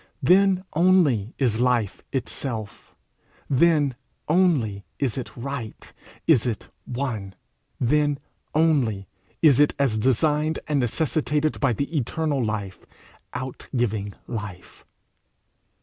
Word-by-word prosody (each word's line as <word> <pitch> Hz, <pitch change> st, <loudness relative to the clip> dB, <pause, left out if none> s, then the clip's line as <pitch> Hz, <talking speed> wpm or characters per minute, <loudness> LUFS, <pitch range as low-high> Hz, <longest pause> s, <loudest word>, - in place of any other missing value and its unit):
Then 190 Hz, 0 st, +4 dB
only 155 Hz, -, +3 dB
is 120 Hz, -5 st, +1 dB
life 120 Hz, -5 st, +1 dB
itself; 115 Hz, -5 st, -4 dB, 0.5 s
then 145 Hz, -1 st, +3 dB, 0.3 s
only 150 Hz, -, +2 dB
is 135 Hz, -6 st, -1 dB
it 130 Hz, -1 st, -6 dB
right, 125 Hz, -3 st, -6 dB, 0.3 s
is 130 Hz, -7 st, +4 dB
it 110 Hz, -4 st, -4 dB, 0.2 s
one; 120 Hz, -7 st, -4 dB, 0.4 s
then 145 Hz, +3 st, +2 dB, 0.4 s
only 135 Hz, -, +2 dB, 0.4 s
is 145 Hz, -5 st, +6 dB
it 145 Hz, -, +4 dB
as 130 Hz, -6 st, +1 dB
designed 150 Hz, +6 st, +2 dB
and 150 Hz, -2 st, +1 dB
necessitated 150 Hz, +4 st, 0 dB
by 140 Hz, -4 st, +2 dB
the 140 Hz, +7 st, -3 dB
eternal 145 Hz, 0 st, 0 dB
life 105 Hz, -3 st, -4 dB, 0.5 s
outgiving 120 Hz, -5 st, -3 dB
Life. 100 Hz, -6 st, -7 dB
130 Hz, 100 wpm, -24 LUFS, 110-150 Hz, 0.5 s, is